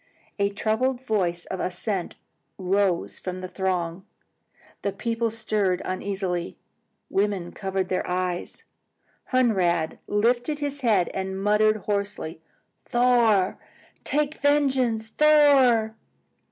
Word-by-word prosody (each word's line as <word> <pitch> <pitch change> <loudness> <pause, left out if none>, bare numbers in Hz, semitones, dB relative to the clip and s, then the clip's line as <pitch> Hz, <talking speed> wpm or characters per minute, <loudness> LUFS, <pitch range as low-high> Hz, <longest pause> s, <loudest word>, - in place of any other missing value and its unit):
A 200 0 +2
troubled 225 +5 0
voice 185 -8 -1
of 190 - -5
assent 185 +1 -3 0.4
rose 190 -1 0
from 185 0 -5
the 185 - -5
throng. 180 -2 -2 0.8
The 200 - -1
people 230 +2 -1
stirred 215 -4 0
uneasily. 185 -2 -3 0.5
Women 195 -3 0
covered 190 -1 -3
their 185 - -1
eyes. 180 -1 -3 0.7
Hunrad 185 -10 +2
lifted 240 +7 +1
his 285 -1 -4
head 210 -8 +2
and 190 0 -4
muttered 210 +1 +2
hoarsely, 200 -6 -3 0.4
"Thor! 240 -6 +3 0.4
take 300 0 0
vengeance! 270 -7 +1
Thor!" 265 -5 +4
205 Hz, 100 wpm, -25 LUFS, 185-240 Hz, 0.8 s, Thor